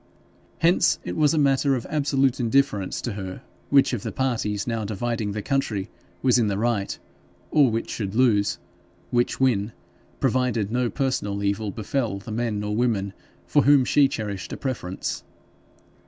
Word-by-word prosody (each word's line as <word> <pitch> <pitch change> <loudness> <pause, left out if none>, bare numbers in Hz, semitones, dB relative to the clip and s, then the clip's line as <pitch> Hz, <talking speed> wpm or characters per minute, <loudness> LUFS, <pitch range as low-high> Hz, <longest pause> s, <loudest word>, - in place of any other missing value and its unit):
Hence, 170 0 +3
it - - -4
was 155 0 +3
a - - 0
matter 140 -1 +3
of 120 - -4
absolute 135 -3 +1
indifference 120 -5 +1
to 120 - -3
her 95 +4 -6 0.3
which 140 -2 +4
of 120 - -2
the 115 0 -4
parties 110 -6 -1
now 115 -2 -2
dividing 110 0 -2
the 105 0 -4
country 110 -8 -1 0.3
was 125 -2 +4
in 115 - +2
the 100 -1 -1
right, 110 -3 -1 0.5
or 145 -4 +5
which 115 0 -2
should 100 -2 -4
lose, 110 -5 +3 0.5
which 120 0 +1
win, 115 -5 +1 0.5
provided 125 -5 +1
no 125 0 +1
personal 105 -8 -1
evil 100 +1 0
befel 110 +1 -2
the 110 +3 -9
men 110 -2 -1
or 105 0 -2
women 105 -5 0 0.3
for 145 - +3
whom 140 -2 +6
she 140 +2 +4
cherished 105 -6 -5
a - - -4
preference. 115 -9 -4
115 Hz, 160 wpm, -24 LUFS, 105-135 Hz, 0.5 s, whom